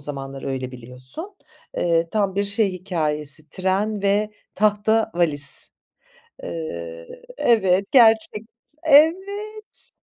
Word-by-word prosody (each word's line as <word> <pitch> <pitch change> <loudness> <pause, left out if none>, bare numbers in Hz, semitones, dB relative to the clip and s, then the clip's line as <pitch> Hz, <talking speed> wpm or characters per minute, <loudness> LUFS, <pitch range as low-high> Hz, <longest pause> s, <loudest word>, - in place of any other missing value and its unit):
zamanlar 135 -1 -5
öyle 130 -1 -4
biliyorsun. 130 - -6 0.4
Eee, 170 -1 +1
tam 200 -3 0
bir 200 - +1
şey 200 -1 +1
hikâyesi, 155 -5 -3
tren 200 +2 -1
ve 205 +2 +1 0.2
tahta 215 +2 +2
valiz. 145 -4 +1 1.7
Evet, 195 -4 +3
gerçekt 225 -2 +4 0.3
evet. 390 +8 +2
200 Hz, 90 wpm, -22 LUFS, 150-220 Hz, 1.7 s, gerçekt